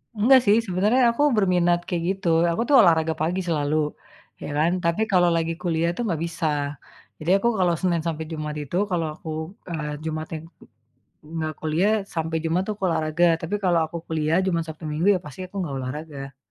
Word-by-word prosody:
Enggak 245 Hz, +6 st, +6 dB
sih, 205 Hz, +1 st, +5 dB
sebenarnya 205 Hz, +8 st, +2 dB
aku 290 Hz, -, +2 dB
berminat 180 Hz, -5 st, +3 dB
kayak 170 Hz, -2 st, -2 dB
gitu, 190 Hz, -2 st, -2 dB, 0.2 s
aku 170 Hz, -, -1 dB
tuh 290 Hz, -, +4 dB
olahraga 160 Hz, -2 st, +3 dB
pagi 175 Hz, +4 st, 0 dB
selalu, 150 Hz, -2 st, 0 dB, 0.7 s
ya -, -, -5 dB
kan, 160 Hz, +3 st, +3 dB
tapi 170 Hz, +5 st, +1 dB
kalau 180 Hz, -2 st, +4 dB
lagi 165 Hz, 0 st, 0 dB
kuliah 170 Hz, -1 st, 0 dB
tuh 240 Hz, -, -2 dB
nggak 170 Hz, -6 st, -1 dB
bisa, 170 Hz, -1 st, -4 dB, 0.7 s
jadi 155 Hz, +3 st, -1 dB
aku 235 Hz, -, +1 dB
kalau 175 Hz, -2 st, +3 dB
Senin 175 Hz, -3 st, +1 dB
sampai 160 Hz, -1 st, -3 dB
Jumat 155 Hz, -1 st, -4 dB
itu 145 Hz, +3 st, -6 dB, 0.2 s
kalau 165 Hz, -3 st, 0 dB
aku, 160 Hz, -, -9 dB, 0.4 s
eee, 150 Hz, -2 st, -3 dB
Jumatnya 160 Hz, 0 st, -4 dB
ng 165 Hz, -, -13 dB, 0.9 s
nggak 155 Hz, 0 st, -2 dB
kuliah, 160 Hz, +6 st, +1 dB, 0.2 s
sampai 160 Hz, -1 st, -1 dB
Jumat 165 Hz, +3 st, +1 dB
tuh 210 Hz, -, -2 dB
olahraga, 165 Hz, 0 st, +1 dB, 0.2 s
tapi 165 Hz, +5 st, -4 dB
kalau 175 Hz, -2 st, +3 dB
aku 170 Hz, -, -7 dB
kuliah, 160 Hz, 0 st, 0 dB
Jumat, 170 Hz, -3 st, 0 dB
Sabtu, 160 Hz, +1 st, -8 dB
Minggu, 155 Hz, +5 st, 0 dB
ya -, -, -2 dB
pasti 150 Hz, +3 st, -10 dB
aku -, -, -31 dB
nggak 150 Hz, -6 st, -3 dB
olahraga. 135 Hz, 0 st, -7 dB
165 Hz, 185 wpm, -24 LUFS, 155-180 Hz, 0.9 s, Enggak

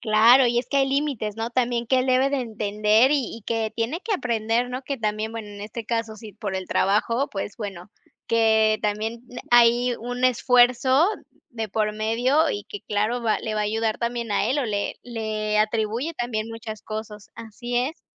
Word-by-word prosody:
Claro, 230 Hz, +4 st, +6 dB
y 240 Hz, 0 st, +2 dB
es 245 Hz, -, -2 dB
que 280 Hz, -, +1 dB
hay 270 Hz, -, +2 dB
límites, 270 Hz, -7 st, -1 dB
¿no?, 225 Hz, +1 st, -3 dB
también 240 Hz, -1 st, 0 dB
que 260 Hz, +1 st, +3 dB
él 255 Hz, -, -1 dB
debe 260 Hz, +1 st, +3 dB
de 280 Hz, -1 st, -1 dB
entender 215 Hz, +2 st, +2 dB
y 265 Hz, -6 st, -1 dB
y 230 Hz, -, -12 dB
que 225 Hz, -1 st, -1 dB
tiene 235 Hz, +9 st, -2 dB
que 435 Hz, +2 st, -3 dB
aprender, 235 Hz, -, 0 dB
¿no?, 255 Hz, +2 st, -5 dB
que 275 Hz, 0 st, -4 dB
también, 215 Hz, 0 st, -2 dB
bueno, 225 Hz, -2 st, -6 dB
en 205 Hz, 0 st, -10 dB
este 220 Hz, +2 st, -6 dB
caso, 230 Hz, -1 st, -2 dB
sí, 215 Hz, -2 st, -11 dB
por 205 Hz, -3 st, -4 dB
el 190 Hz, -, -5 dB
trabajo. 230 Hz, +7 st, +1 dB
Pues, 195 Hz, 0 st, -5 dB
bueno, 195 Hz, -5 st, -7 dB, 0.4 s
que 220 Hz, -1 st, +3 dB
también, 215 Hz, +2 st, -2 dB
mm, 245 Hz, -, -12 dB, 0.2 s
hay 240 Hz, +1 st, +5 dB
un 245 Hz, +2 st, -3 dB
esfuerzo 250 Hz, -, +4 dB, 0.4 s
de 225 Hz, -3 st, -4 dB
por 210 Hz, +1 st, 0 dB
medio 245 Hz, +8 st, +2 dB
y 205 Hz, -, -4 dB
que, 205 Hz, -, -8 dB
claro, 215 Hz, +4 st, 0 dB
va 220 Hz, -2 st, +1 dB
le 215 Hz, -1 st, -4 dB
va 210 Hz, -, 0 dB
a -, -, +1 dB
ayudar 220 Hz, +1 st, -1 dB
también 235 Hz, -2 st, -2 dB
a -, -, +1 dB
él 275 Hz, +3 st, +1 dB
o 280 Hz, -, 0 dB
le 205 Hz, -1 st, -2 dB
le 215 Hz, -2 st, -2 dB
atribuye 225 Hz, +8 st, 0 dB
también 230 Hz, -4 st, -3 dB
muchas 225 Hz, -2 st, -8 dB
cosas. 215 Hz, -1 st, -7 dB
Así 240 Hz, +2 st, -6 dB
es. 260 Hz, +7 st, -1 dB
230 Hz, 200 wpm, -24 LUFS, 215-245 Hz, 0.4 s, Claro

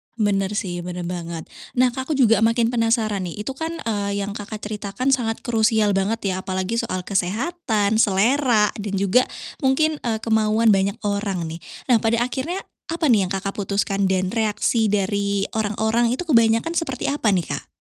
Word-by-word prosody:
Benar 205 Hz, -2 st, 0 dB
sih, 180 Hz, -5 st, -2 dB
benar 180 Hz, 0 st, -5 dB
banget. 170 Hz, -2 st, -5 dB, 0.3 s
Nah, 250 Hz, 0 st, +4 dB
Kak 260 Hz, +2 st, -5 dB
aku -, -, +2 dB
juga 225 Hz, -4 st, +5 dB
makin 230 Hz, +1 st, +2 dB
penasaran 225 Hz, -4 st, +1 dB
nih 205 Hz, +5 st, -6 dB
itu 270 Hz, -, -3 dB
kan, 320 Hz, +4 st, -4 dB
eee, 200 Hz, -2 st, -1 dB
yang 200 Hz, -, -4 dB
Kakak 210 Hz, +1 st, -7 dB
ceritakan 210 Hz, +5 st, -2 dB
sangat 225 Hz, -3 st, -1 dB
krusial 220 Hz, -3 st, +2 dB
banget 195 Hz, +1 st, 0 dB
ya -, -, -2 dB
apalagi 190 Hz, +4 st, -2 dB
soal 185 Hz, -1 st, -3 dB
kesehatan, 215 Hz, -, 0 dB
selera 225 Hz, +2 st, +3 dB
dan 205 Hz, -1 st, -4 dB
juga 200 Hz, +6 st, +3 dB, 0.3 s
mungkin, 300 Hz, +3 st, +2 dB
eee, 230 Hz, -2 st, -1 dB
kemauan 220 Hz, 0 st, +3 dB
banyak 195 Hz, +2 st, +1 dB
orang 200 Hz, -3 st, -1 dB
nih. 165 Hz, +1 st, -6 dB, 0.3 s
Nah, 235 Hz, -, +7 dB
pada 230 Hz, +1 st, +2 dB
akhirnya 270 Hz, +9 st, -3 dB, 0.3 s
apa 330 Hz, -1 st, -1 dB
nih 200 Hz, -5 st, +3 dB
yang -, -, -10 dB
Kakak 195 Hz, +1 st, -2 dB
putuskan 200 Hz, -1 st, 0 dB
dan 185 Hz, 0 st, 0 dB
reaksi 220 Hz, 0 st, +1 dB
dari 200 Hz, 0 st, 0 dB
orang-orang 220 Hz, +2 st, +1 dB
itu 360 Hz, -, -4 dB
kebanyakan 230 Hz, 0 st, +3 dB
seperti 280 Hz, -6 st, -1 dB
apa 280 Hz, -6 st, -1 dB
nih 180 Hz, -4 st, +1 dB
Kak? -, -, -6 dB
215 Hz, 170 wpm, -22 LUFS, 195-235 Hz, 0.3 s, Nah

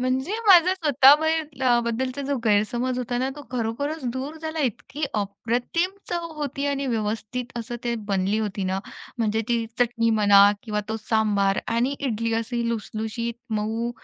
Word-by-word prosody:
म्हणजे 260 Hz, +8 st, -1 dB
माझा 365 Hz, -1 st, +7 dB
स्वतः 290 Hz, -5 st, +6 dB
बाहेर 315 Hz, -4 st, -1 dB
अ, 240 Hz, -1 st, +4 dB
बद्दलचा 255 Hz, +4 st, -2 dB
जो 280 Hz, 0 st, -1 dB
गैरसमज 240 Hz, +4 st, +1 dB
होता 245 Hz, 0 st, -2 dB
ना, 260 Hz, +2 st, 0 dB
तो 290 Hz, -, -8 dB
खरोखरच 260 Hz, +6 st, -2 dB
दूर 270 Hz, +5 st, -5 dB
झाला 315 Hz, 0 st, -4 dB
इतकी 275 Hz, +4 st, -2 dB
अप्रतिम 235 Hz, -, -1 dB, 0.2 s
चव 345 Hz, -1 st, -2 dB
होती 285 Hz, 0 st, -2 dB
आणि 280 Hz, -1 st, -1 dB
व्यवस्थित 230 Hz, +2 st, -3 dB
असं 235 Hz, +1 st, -5 dB
ते 235 Hz, -, 0 dB, 0.2 s
बनली 195 Hz, +2 st, +1 dB
होती 205 Hz, -2 st, -2 dB
ना. 190 Hz, +1 st, -1 dB, 0.4 s
म्हणजे 220 Hz, -1 st, +1 dB
ती 235 Hz, -1 st, +1 dB, 0.2 s
चटणी 230 Hz, -1 st, +2 dB
म्हणा 205 Hz, -1 st, +7 dB, 0.2 s
किंवा 210 Hz, -2 st, -2 dB
तो 220 Hz, -, -2 dB
सांबार 205 Hz, -3 st, +2 dB, 0.2 s
आणि 250 Hz, +4 st, +1 dB
इडली 230 Hz, -4 st, -1 dB
अशी 235 Hz, +1 st, -1 dB
लुसलुशीत, 225 Hz, +1 st, -3 dB, 0.2 s
मऊ. 220 Hz, +2 st, -1 dB
240 Hz, 160 wpm, -24 LUFS, 220-275 Hz, 0.4 s, माझा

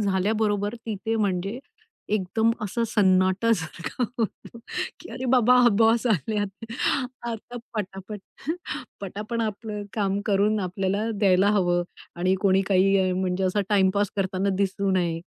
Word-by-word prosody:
झाल्याबरोबर 205 Hz, +1 st, +1 dB
तिथे 225 Hz, +1 st, -2 dB
म्हणजे 200 Hz, +1 st, -1 dB, 0.5 s
एकदम 215 Hz, +3 st, +2 dB
असं 230 Hz, +3 st, -1 dB
सन्नाटासारखा, 190 Hz, 0 st, +1 dB, 1.0 s
की -, -, -11 dB
अरे 255 Hz, +2 st, -5 dB
बाबा 250 Hz, 0 st, +6 dB, 0.2 s
बॉस 230 Hz, +2 st, +4 dB
आलेत 205 Hz, -, -1 dB, 0.6 s
आता 235 Hz, +2 st, -6 dB, 0.2 s
पटापट, 200 Hz, 0 st, -5 dB, 0.8 s
पटापट 210 Hz, +4 st, -4 dB
आपलं 210 Hz, -1 st, -4 dB
काम 200 Hz, -2 st, 0 dB
करून, 210 Hz, +1 st, +2 dB
आपल्याला 195 Hz, +3 st, -1 dB
द्यायला 195 Hz, -1 st, +4 dB
हवं. 175 Hz, -4 st, +2 dB, 0.3 s
आणि 185 Hz, +2 st, +2 dB
कोणी 195 Hz, -1 st, +3 dB
काही 190 Hz, -1 st, +3 dB
म्हणजे 185 Hz, 0 st, -1 dB
असा 185 Hz, +3 st, +1 dB
टाईमपास 200 Hz, 0 st, +2 dB
करताना 195 Hz, 0 st, 0 dB
दिसू 195 Hz, 0 st, 0 dB
नये. 170 Hz, -3 st, 0 dB
200 Hz, 115 wpm, -25 LUFS, 190-215 Hz, 1.0 s, बाबा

